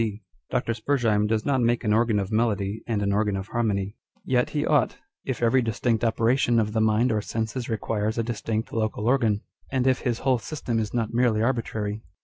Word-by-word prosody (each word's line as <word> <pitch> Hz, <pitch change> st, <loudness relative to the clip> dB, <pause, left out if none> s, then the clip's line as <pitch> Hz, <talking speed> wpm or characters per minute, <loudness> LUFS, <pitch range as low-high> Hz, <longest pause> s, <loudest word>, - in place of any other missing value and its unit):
D. 110 Hz, -1 st, -3 dB, 0.3 s
Dr. 115 Hz, -, 0 dB
Spurzheim 110 Hz, -3 st, +1 dB
does 110 Hz, 0 st, 0 dB
not 135 Hz, -3 st, +2 dB
make 120 Hz, +1 st, +1 dB
an 105 Hz, -2 st, +2 dB
organ 115 Hz, -1 st, +3 dB
of 100 Hz, 0 st, -2 dB
melody 110 Hz, -2 st, 0 dB
and 105 Hz, -3 st, 0 dB
an 100 Hz, 0 st, +1 dB
organ 105 Hz, -1 st, +1 dB
of 95 Hz, +2 st, -6 dB
harmony; 105 Hz, -3 st, -1 dB, 0.3 s
yet 125 Hz, -1 st, +2 dB
he 150 Hz, 0 st, -1 dB
ought, 150 Hz, -2 st, +2 dB, 0.3 s
if 125 Hz, -3 st, -3 dB
every 125 Hz, +3 st, +4 dB
distinct 115 Hz, 0 st, 0 dB
opera 115 Hz, +1 st, +2 dB
tion 120 Hz, -3 st, +2 dB
of 105 Hz, -1 st, 0 dB
the 110 Hz, -, +1 dB
mind 110 Hz, +3 st, +3 dB
or 105 Hz, -1 st, +1 dB
senses 115 Hz, +3 st, -3 dB
requires 110 Hz, 0 st, -1 dB
a 115 Hz, -, +1 dB
distinct 115 Hz, -1 st, -3 dB
local 110 Hz, -1 st, -1 dB
organ, 115 Hz, -5 st, +2 dB, 0.3 s
and 130 Hz, -2 st, +1 dB
if 130 Hz, -1 st, +3 dB
his 120 Hz, -3 st, -1 dB
whole 130 Hz, -3 st, +3 dB
system 120 Hz, -3 st, -3 dB
is 110 Hz, -2 st, -2 dB
not 115 Hz, -2 st, -1 dB
merely 115 Hz, -3 st, +2 dB
arbitrary. 110 Hz, -4 st, -1 dB
115 Hz, 205 wpm, -25 LUFS, 105-120 Hz, 0.3 s, every